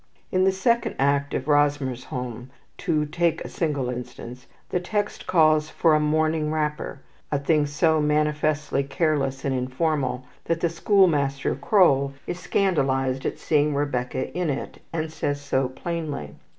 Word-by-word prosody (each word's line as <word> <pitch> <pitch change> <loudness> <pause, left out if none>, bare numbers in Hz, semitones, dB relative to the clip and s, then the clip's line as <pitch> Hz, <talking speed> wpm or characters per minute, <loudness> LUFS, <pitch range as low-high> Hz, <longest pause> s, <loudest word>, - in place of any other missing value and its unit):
In 185 0 +3
the 190 - +5
second 235 +5 +1
act 140 +1 +1
of 130 - -2
"Rosmersholm," 130 -4 0 0.3
to 155 -2 +1
take 165 +2 0
a - - -4
single 145 -6 -1
instance, 125 0 -7 0.2
the 180 - 0
text 205 +3 -3
calls 155 -2 +4
for 165 -2 +3
a 155 - +4
morning 155 0 +1
wrapper, 150 -3 -2 0.3
a 145 - +2
thing 145 +1 +2
so 160 +1 +2
manifestly 150 -1 +1
careless 140 -2 -1
and 135 - +1
informal 130 0 -1 0.2
that 165 0 0
the 170 - +1
school 195 +4 +4
master, 140 -4 0
Kroll, 140 -9 +3
is 175 - -4
scandalized 135 -10 +1
at - - -3
seeing 150 -1 +1
Rebecca 130 -3 -2
in 180 -2 0
it, 140 - -4
and 160 -1 -3
says 145 -2 -2
so 135 -2 0
plainly. 150 - -5
150 Hz, 150 wpm, -24 LUFS, 135-160 Hz, 0.3 s, the